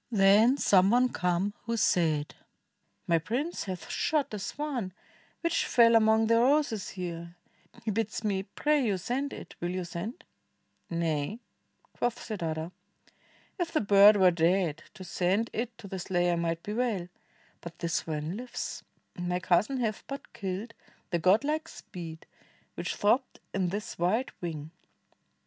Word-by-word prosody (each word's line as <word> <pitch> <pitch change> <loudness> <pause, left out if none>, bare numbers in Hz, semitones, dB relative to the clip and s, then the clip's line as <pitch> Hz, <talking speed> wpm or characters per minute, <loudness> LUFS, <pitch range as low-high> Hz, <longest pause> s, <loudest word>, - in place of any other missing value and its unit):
Then 215 +4 +5
some 190 -7 +5
one 245 +2 +3
came 180 +3 0
who 230 0 0
said, 155 -7 +2 0.7
"My 165 -1 +3
prince 255 - -2
hath 185 -2 -5
shot 295 -6 0
A 210 - -3
swan, 250 -5 -3 0.5
which 335 -1 +1
fell 235 -1 +6
among 220 0 +5
the 230 +1 +4
roses 255 -5 +2
here, 170 -2 -6 0.5
He 220 - +1
bids 220 +1 -2
me 200 -3 0
pray 290 +9 +1
you 205 -5 +1
send 265 +9 -2
it. - - -9
Will 175 - -1
you 185 0 -2
send?" 215 - -6 0.7
"Nay," 165 +4 -1 0.5
quoth 240 -1 -1
Siddartha, 165 -6 -4 0.9
"if 345 -2 -1
the 310 - +2
bird 205 +1 +7
were 185 -2 +6
dead 170 -2 +1
To 190 - -9
send 185 +5 0
it 235 +1 -3
to 225 -4 -10
the 190 -1 -5
slayer 175 -1 +1
might 170 0 -2
be 210 - -4
well. 220 -7 -1 0.5
But 170 -1 -9
the 170 - -3
swan 160 +2 -2
Uves; 250 0 -5 0.4
my 180 0 -1
cousin 190 +9 +2
hath 215 -3 -2
but 275 0 -7
killed 200 +3 -4 0.4
The 170 - +1
godlike 280 - +2
speed 165 -4 -9 0.5
which - - -3
throbbed 245 +6 +1
in 185 -2 0
this 205 0 -5
white 215 +9 +1
wing." 160 -3 -5
195 Hz, 150 wpm, -29 LUFS, 175-235 Hz, 0.9 s, bird